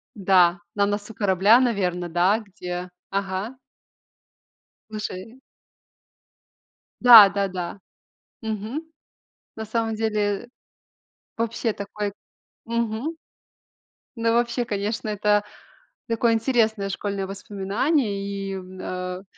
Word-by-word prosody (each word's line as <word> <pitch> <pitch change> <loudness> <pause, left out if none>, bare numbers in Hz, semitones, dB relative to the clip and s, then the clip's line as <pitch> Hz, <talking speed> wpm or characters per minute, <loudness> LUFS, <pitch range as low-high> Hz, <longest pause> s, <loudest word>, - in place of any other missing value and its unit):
Да, 180 -3 +4 0.2
на 200 -1 +3
носу 205 +2 -3
корабля, 205 +3 +4
наверно, 180 -8 0
да, 180 +6 +3
где? 180 -3 -6 0.2
Ага. 195 +4 -3 1.3
Слушай. 215 +2 -6 1.6
Да, 225 -5 +11
да, 200 0 0
да. 185 +1 -5 0.6
Мгм. 220 +7 -3 0.7
На 220 0 -5
самом 225 0 -1
деле 210 0 -1 0.9
вообще, 230 -1 -1
такой 205 0 -4 0.5
Мгм. 235 +6 -2 1.0
Ну, 230 0 +1
вообще, 240 +1 +1
конечно, 210 +1 -3
это 210 0 +2 0.6
такое 230 0 +2
интересное 225 -3 +1
школьное 200 0 -3
воспоминание. 200 - -1
И, 200 -1 -4
м, 185 0 -8
э, 180 +1 -5
205 Hz, 95 wpm, -24 LUFS, 195-225 Hz, 1.6 s, Да